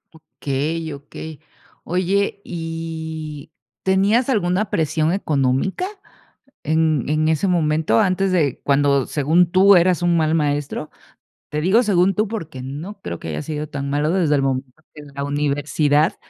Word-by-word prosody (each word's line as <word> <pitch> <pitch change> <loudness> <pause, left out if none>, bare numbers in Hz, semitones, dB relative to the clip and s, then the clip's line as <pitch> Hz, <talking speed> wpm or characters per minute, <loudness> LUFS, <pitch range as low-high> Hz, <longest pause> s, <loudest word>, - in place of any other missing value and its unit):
Okey, 155 +1 -4
okey, 145 +2 -9 0.4
oye, 190 +3 0
¿y 160 -2 -6 0.3
tenías 200 +7 +2
alguna 200 -3 +1
presión 155 -1 0
económica 155 - 0 0.8
en 155 -3 +1
en 155 +1 +1
ese 160 +5 +1
momento, 155 -8 +2
antes 190 +1 +1
de 155 -7 +1
cuando, 140 -1 +2
según 165 +4 +2
tú, 195 +2 +6
eras 175 -1 +3
un 175 -1 +3
mal 160 0 +2
maestro? 145 0 -1 0.6
Te 150 - -2
digo 190 +9 +4
"según 195 -3 +2
tú", 215 +3 0
porque 165 - -6
no 150 +10 -7
creo 85 -1 -5
que - - -8
haya 75 -1 -3
sido 150 -1 -4
tan 140 -1 -4
malo 145 +2 +1
desde 170 -5 +2
el - - +2
momento 135 +2 -3
que 150 - -10
la 140 - -4
universidad 145 +1 +1
160 Hz, 145 wpm, -21 LUFS, 145-180 Hz, 0.8 s, tú